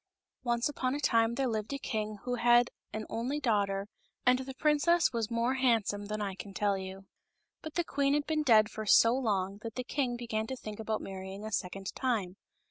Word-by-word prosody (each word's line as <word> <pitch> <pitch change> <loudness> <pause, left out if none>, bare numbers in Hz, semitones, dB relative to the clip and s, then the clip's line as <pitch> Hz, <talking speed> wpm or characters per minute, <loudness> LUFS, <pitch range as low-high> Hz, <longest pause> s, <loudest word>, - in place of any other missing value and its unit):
NCE 240 0 +1
upon 265 -2 -1
a - - -2
time 230 -4 +3
there 270 - 0
lived 220 -2 -2
a - - -1
king 215 -5 -3
who 250 - -2
had 240 0 +4 0.2
an 215 0 -4
only 250 +6 -2
daughter, 200 -6 0 0.4
and 250 0 +5
the 265 0 -6
princess 305 +3 +3
was 230 -2 -1
more 235 +2 +1
handsome 225 -6 +1
than 215 0 -3
I 200 -2 -2
can 195 +1 -9
tell 205 0 +2
you. 190 0 -7 0.6
But 315 - -8
the 345 - +2
queen 280 -3 +1
had 295 0 0
been 310 -1 0
dead 220 -7 +5
for 215 -1 -6
so 230 +3 +6
long 200 -6 -1
that 225 -1 -6
the 255 - -2
king 250 -2 -1
began 225 -2 -2
to 260 - -3
think 215 -4 -8
about 220 0 -2
marrying 190 +1 -7
a 220 - -5
second 195 0 -3
time. 210 -8 -1
230 Hz, 210 wpm, -31 LUFS, 205-260 Hz, 0.6 s, so